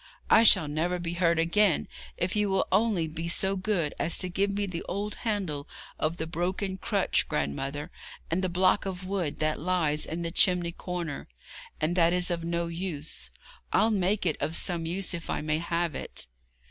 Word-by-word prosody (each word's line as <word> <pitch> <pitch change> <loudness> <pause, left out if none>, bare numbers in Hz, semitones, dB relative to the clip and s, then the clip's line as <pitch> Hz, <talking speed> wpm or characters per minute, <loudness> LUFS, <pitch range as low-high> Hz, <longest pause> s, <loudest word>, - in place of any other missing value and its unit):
I - - +8
shall 190 -8 +6
never 165 +5 -1
be 170 -1 -4
hurt 170 -1 +2
again 170 +2 +3 0.3
if 180 +3 -1
you 210 -1 +2
will 195 - +2
only 195 -5 +2
be 165 +2 -5
so 190 +3 +1
good 185 -6 0
as 165 - +2
to 185 - -1
give 195 +3 +1
me 200 +1 -1
the 180 -3 -4
old 205 +2 -2
handle 190 -11 -3 0.3
of 160 +2 0
the 160 - -3
broken 185 +3 -2
crutch, - - +1
grandmother, 135 - -2 0.4
and 180 +3 0
the 185 - +1
block 185 +3 +3
of 185 -1 -5
wood 185 -6 -1
that 155 0 +1
lies 155 -3 +1
in 170 +2 -4
the 165 - -3
chimney 180 -2 +3
corner, 170 -4 -5 0.5
and 160 +3 0
that 170 -1 +4
is 180 0 +2
of 170 -1 -2
no 170 0 -1
use. 170 -3 -4 0.4
I'll 225 - +4
make 195 0 +1
it 160 - +1
of 160 - -1
some 170 -3 +2
use, 185 +3 -1
if 170 -1 -6
I - - -1
may 155 0 0
have 170 -1 -1
it.' - - -5
175 Hz, 190 wpm, -28 LUFS, 165-190 Hz, 0.5 s, I